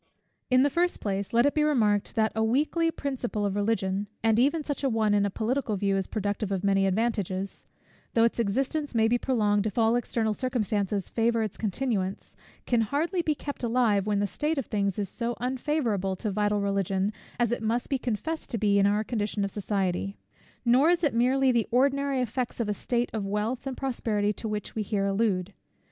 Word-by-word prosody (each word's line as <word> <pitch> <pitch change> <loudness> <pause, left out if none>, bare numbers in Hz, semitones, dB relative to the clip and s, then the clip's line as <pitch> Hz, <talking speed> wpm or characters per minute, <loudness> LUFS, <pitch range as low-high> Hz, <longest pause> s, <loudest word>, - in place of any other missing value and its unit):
In 255 0 +5
the 285 - +2
first 350 +4 +1
place, 200 -1 -2
let 235 +2 +4
it 285 - +3
be 305 - +1
remarked, 225 -10 +2
that 220 -1 +2
a 220 - +1
weakly 300 +8 +2
principle 255 -9 -3
of 200 -1 -1
Religion, 205 -2 0 0.2
and 225 0 +3
even 290 +5 +2
such 285 -1 -4
an 270 - +2
one, 215 -2 +2
in 205 0 +3
a - - -2
political 225 +1 -1
view, 195 0 +1
is 195 -1 -1
productive 205 -1 -2
of 190 -1 -1
many 195 -1 +3
advantages; 195 -2 -1 0.5
though 230 - +5
its 230 +1 +1
existence 270 +6 -1
may 225 -1 +4
be 240 +2 +2
prolonged 210 -5 +1
if 210 - -5
all 225 0 +4
external 230 -2 0
circumstances 210 -5 -1
favour 230 0 +1
its 215 - -4
continuance, 205 -3 -2 0.3
can 240 -2 +2
hardly 305 - 0
be 310 -2 0
kept 285 0 -6
alive, 230 -4 +2
when 210 -1 +1
the 205 - +1
state 300 +9 -2
of 270 - -1
things 200 -3 -1
is 205 -2 -1
so 235 +4 -3
unfavourable 245 -7 -1
to 210 +3 -3
vital 205 +1 +1
Religion, 195 0 0 0.3
as 240 -1 +2
it 240 - -1
must 230 +2 0
be 270 -2 -1
confessed 255 +8 -3
to 235 - -2
be 205 -1 +3
in 200 - +4
our 210 +1 +2
condition 210 -3 -1
of 195 - -4
society. 195 -1 -2 0.5
Nor 255 +6 +5
is 350 0 +2
it 290 - +2
merely 260 +3 +3
the 235 -3 +1
ordinary 275 +2 +2
effects 245 +1 -3
of 230 - 0
a 210 - 0
state 240 +4 -1
of 220 -2 -2
wealth 215 +6 -2
and 265 - -4
prosperity 215 -6 -1
to 220 - -5
which 210 -1 -4
we 220 - -2
here 205 -1 -1
allude. 195 -2 0
220 Hz, 205 wpm, -27 LUFS, 205-255 Hz, 0.5 s, In